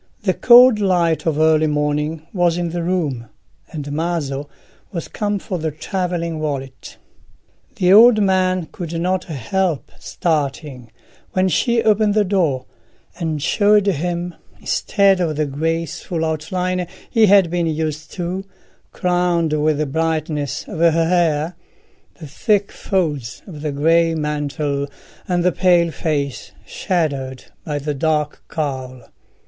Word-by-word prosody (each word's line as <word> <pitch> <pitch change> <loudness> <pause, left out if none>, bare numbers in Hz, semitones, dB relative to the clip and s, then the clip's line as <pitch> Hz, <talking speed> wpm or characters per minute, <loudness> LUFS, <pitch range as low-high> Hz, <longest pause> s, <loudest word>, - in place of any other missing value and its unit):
The 190 -3 +2
cold 245 0 +7
light 175 -5 +1
of 155 -2 +1
early 155 0 +4
morning 150 +1 -1
was 175 -3 +2
in 175 -1 -2
the 175 0 -3
room, 155 -10 -2 0.4
and 145 -2 -6
Maso 145 -3 -2 0.4
was 170 -5 -5
come 205 -1 -2
for 185 -2 -5
the 160 0 -1
travelling 170 0 -3
wallet. 135 -4 -5 0.8
The 185 -4 +3
old 225 +1 +8
man 185 -3 +2
could 170 -1 -5
not 185 +2 0
help 165 +2 -2
starting 140 -6 -3 0.4
when 185 0 +2
she 235 +5 +1
opened 215 -1 +3
the 215 - +4
door, 175 -10 0 0.5
and 155 -4 -2
showed 205 +4 +3
him, 175 -1 -1 0.3
instead 200 -2 +2
of 165 -4 0
the 155 +1 0
graceful 165 +3 -2
outline 180 +3 -2 0.2
he 225 -2 +4
had 195 -4 +5
been 175 -1 0
used 155 -1 -3
to, 180 +1 -3 0.5
crowned 175 -3 0
with 155 0 +1
the 155 - 0
brightness 155 -1 -2
of 160 - -7
her 170 0 +5
hair, 165 -1 +1 0.6
the 160 - -8
thick 200 - 0
folds 150 - -2
of 155 -7 -10
the 150 -1 -2
grey 165 +3 +2
mantle 145 -2 -2 0.4
and 175 -1 0
the 180 - +3
pale 175 -2 +3
face 145 -5 -3
shadowed 140 -7 -2 0.2
by 150 -2 -3
the 145 +1 -3
dark 150 +1 -1
cowl. 130 -5 -4
165 Hz, 135 wpm, -19 LUFS, 150-180 Hz, 0.8 s, old